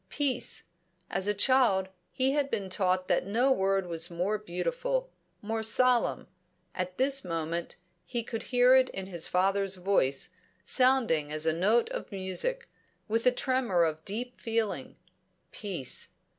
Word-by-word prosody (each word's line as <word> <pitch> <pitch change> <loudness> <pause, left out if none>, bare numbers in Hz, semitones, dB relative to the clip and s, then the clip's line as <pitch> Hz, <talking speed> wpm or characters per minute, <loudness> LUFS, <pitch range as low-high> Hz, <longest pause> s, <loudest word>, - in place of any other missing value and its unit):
Peace! 255 -5 0 0.5
As 190 - 0
a 210 - +2
child 205 -4 +3 0.2
he 265 +1 +1
had 285 -1 0
been 200 -6 -3
taught 185 -1 +1
that - - +1
no 240 +7 +2
word 195 -4 +1
was 170 0 -2
more 180 +5 -1
beautiful, - - -2 0.3
more 220 +1 -2
solemn; 245 +2 +3 0.5
at 185 0 -4
this 270 +1 +2
moment, 165 0 -3 0.3
he 240 -2 -3
could 225 0 -5
hear 250 0 +5
it 260 0 +5
in 190 - -6
his 175 -4 -1
father's 195 +1 +1
voice, 180 -8 0 0.4
sounding 245 - +3
as 155 +1 0
a 160 - +2
note 205 +8 +2
of - - -6
music, 195 - -2 0.4
with 230 +2 0
a - - +7
tremor 245 -8 +1
of 160 -1 -2
deep 245 +5 -5
feeling. 225 -2 -2 0.6
Peace! 190 - -3
205 Hz, 145 wpm, -29 LUFS, 185-255 Hz, 0.6 s, a